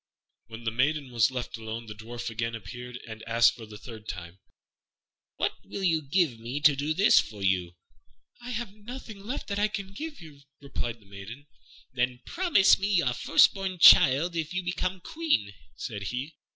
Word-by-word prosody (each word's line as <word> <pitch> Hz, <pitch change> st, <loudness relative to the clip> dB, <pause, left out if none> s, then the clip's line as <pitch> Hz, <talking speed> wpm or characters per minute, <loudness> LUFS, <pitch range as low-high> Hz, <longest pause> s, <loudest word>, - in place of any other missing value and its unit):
When 115 Hz, +1 st, -10 dB
the 110 Hz, -, -1 dB
maiden 140 Hz, +3 st, 0 dB
was 120 Hz, -1 st, +3 dB
left 125 Hz, -3 st, -5 dB
alone, 110 Hz, +1 st, -6 dB
the 105 Hz, -, -8 dB
Dwarf 115 Hz, +2 st, -6 dB
again 115 Hz, +1 st, -2 dB
appeared 125 Hz, +4 st, -8 dB
and 110 Hz, -1 st, -8 dB
asked, 115 Hz, 0 st, +5 dB
for 115 Hz, -2 st, -10 dB
the 105 Hz, -1 st, -10 dB
third 110 Hz, -1 st, -11 dB
time, 85 Hz, +1 st, -7 dB, 1.0 s
"What -, -, 0 dB
will 195 Hz, -, -6 dB
you 165 Hz, -4 st, +2 dB
give 145 Hz, -4 st, +1 dB
me 120 Hz, +5 st, -4 dB
to 150 Hz, -1 st, +6 dB
do 145 Hz, +3 st, -1 dB
this 200 Hz, +4 st, +6 dB
for 105 Hz, -2 st, -5 dB
you?" 90 Hz, -2 st, 0 dB, 0.7 s
"I 245 Hz, -, -8 dB
have 235 Hz, -4 st, -4 dB
nothing 220 Hz, 0 st, -9 dB
left 230 Hz, +8 st, -5 dB
that 200 Hz, 0 st, -2 dB
I 210 Hz, -, +3 dB
can 200 Hz, -2 st, -6 dB
give 305 Hz, +6 st, -6 dB
you," 155 Hz, -5 st, -13 dB, 0.2 s
replied 120 Hz, -5 st, -5 dB
the -, -, -21 dB
maiden. 100 Hz, +8 st, -10 dB, 0.5 s
"Then 125 Hz, 0 st, -1 dB
promise 335 Hz, -, +4 dB
me 195 Hz, -, 0 dB
your 170 Hz, -11 st, +2 dB
first -, -, +5 dB
born 190 Hz, -2 st, -4 dB
child 165 Hz, +1 st, +7 dB
if 165 Hz, +1 st, -3 dB
you 180 Hz, -, -1 dB
become 185 Hz, +1 st, -2 dB
Queen," 305 Hz, -, -1 dB, 0.2 s
said 105 Hz, -3 st, -6 dB
he. 125 Hz, +9 st, -4 dB
135 Hz, 185 wpm, -28 LUFS, 115-185 Hz, 1.0 s, child